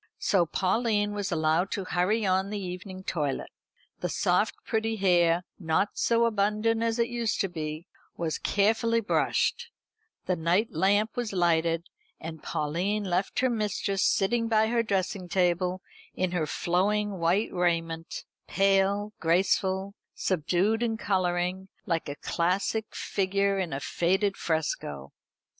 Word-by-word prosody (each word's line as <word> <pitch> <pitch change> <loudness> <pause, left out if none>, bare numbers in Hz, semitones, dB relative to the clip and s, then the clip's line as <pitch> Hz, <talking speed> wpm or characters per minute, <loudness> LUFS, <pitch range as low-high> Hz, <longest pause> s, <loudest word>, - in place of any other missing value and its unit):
So 180 -4 +2
Pauline 205 +3 +1
was 205 -1 -3
allowed 160 +3 +1
to 195 - -2
hurry 185 +5 +1
on 190 +1 +1
the 210 - -3
evening 185 0 -7
toilet. 150 -7 -2 0.5
The - - -2
soft - - +1
pretty 225 0 0
hair, 175 -3 +3 0.2
not 170 +3 +1
so 235 0 +2
abundant 215 +1 +1
as 230 0 0
it 235 0 +2
used 235 -2 -1
to 195 - +1
be, 155 -2 -5 0.3
was 160 -3 -2
carefully 225 +3 +2
brushed; 470 - 0 0.6
the 185 - +1
night 175 +7 +1
lamp 200 +6 +2
was 240 -4 -3
lighted; 170 -2 +2 0.3
and 160 -1 -7
Pauline 180 +8 -1
left 190 +3 -1
her 260 - +3
mistress 205 -3 -1
sitting 230 +4 +2
by 220 -1 +3
her 235 0 +2
dressing 195 -3 -2
table 180 0 +1 0.3
in 185 -1 0
her 170 -4 -1
flowing 195 +4 0
white 175 +6 +1
raiment, 165 -2 -1 0.2
pale, 195 +2 +2
graceful, 190 +3 +1 0.2
subdued 185 +5 +1
in 225 -2 0
colouring, 185 -2 -1 0.2
like 165 -3 -1
a 145 - -4
classic 190 +8 -1
figure 195 0 0
in 185 -3 -2
a 135 - -2
faded 190 +7 0
fresco. 75 - -3
190 Hz, 135 wpm, -28 LUFS, 175-210 Hz, 0.6 s, hair